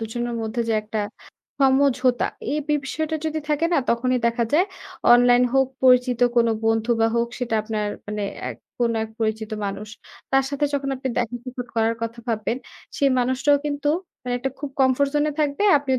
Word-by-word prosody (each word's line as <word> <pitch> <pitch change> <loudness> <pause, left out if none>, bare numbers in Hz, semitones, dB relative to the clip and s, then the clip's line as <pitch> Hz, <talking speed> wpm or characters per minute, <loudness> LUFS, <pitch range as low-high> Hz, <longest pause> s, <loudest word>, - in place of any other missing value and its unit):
দুজনের 235 +2 -3
মধ্যে 220 +2 -2
যে - - +2
একটা 215 0 -3 0.6
সমঝোতা, 265 -2 +3 0.3
এই 300 - 0
বিষয়টা 300 +2 -1
যদি 315 0 -1
থাকে 300 +2 +1
না 330 - +4
তখনই 255 +2 +1
দেখা 235 0 +1
যায় 355 +6 +4 0.5
অনলাইন 245 0 +6
হোক, 265 -1 +4 0.2
পরিচিত 250 -1 +4 0.2
কোনো 235 -1 +4 0.2
বন্ধু 225 +1 +1
বা 225 - +5
হোক, 235 0 +1
সেটা 240 -3 -2
আপনার 215 -1 -2 0.2
মানে 210 0 -3 0.3
এক - - -6 0.2
কোনো 235 -1 +2
এক 220 - -10
পরিচিত 220 0 -1
মানুষ, 200 +1 -4 0.4
তার 270 0 +4
সাথে 280 +1 0
যখন 275 -1 -1
আপনি 260 +1 -4
দেখা 240 0 -1
সাক্ষাৎ 250 -1 -6
করার 225 0 +2
কথা 230 +1 -4
ভাববেন, 225 +1 -1 0.4
সেই 280 -3 +3
মানুষটাও 260 +3 +3
কিন্তু 290 0 -1 0.3
মানে 245 0 -2
একটা 270 - -1
খুব 290 -1 -5
comfort 265 +2 +3
zone-এ 295 +1 +2
থাকবে, 290 +6 0 0.2
আপনিও 265 -2 0
250 Hz, 175 wpm, -23 LUFS, 230-275 Hz, 0.6 s, অনলাইন